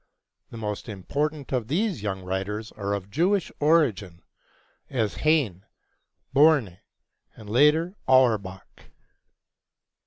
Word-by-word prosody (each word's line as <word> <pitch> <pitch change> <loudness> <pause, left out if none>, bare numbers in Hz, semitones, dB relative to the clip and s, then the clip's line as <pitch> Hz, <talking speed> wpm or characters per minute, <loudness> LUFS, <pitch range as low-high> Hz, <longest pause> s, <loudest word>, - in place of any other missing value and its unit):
The 115 - -10
most 105 +1 -5
important 145 - -3
of 120 -4 -1
these 185 - -1
young 95 -2 -4
writers 95 +4 -4
are 100 -1 -4
of 100 0 -5
Jewish 185 - +1
origin, 115 - +1 0.7
as 115 -6 -2
Heine, 140 - +1 0.7
Börne, 140 - +4 0.6
and 110 - -13
later, 150 - +3 0.2
Auerbach. 110 -8 +1
115 Hz, 100 wpm, -25 LUFS, 100-150 Hz, 0.7 s, Börne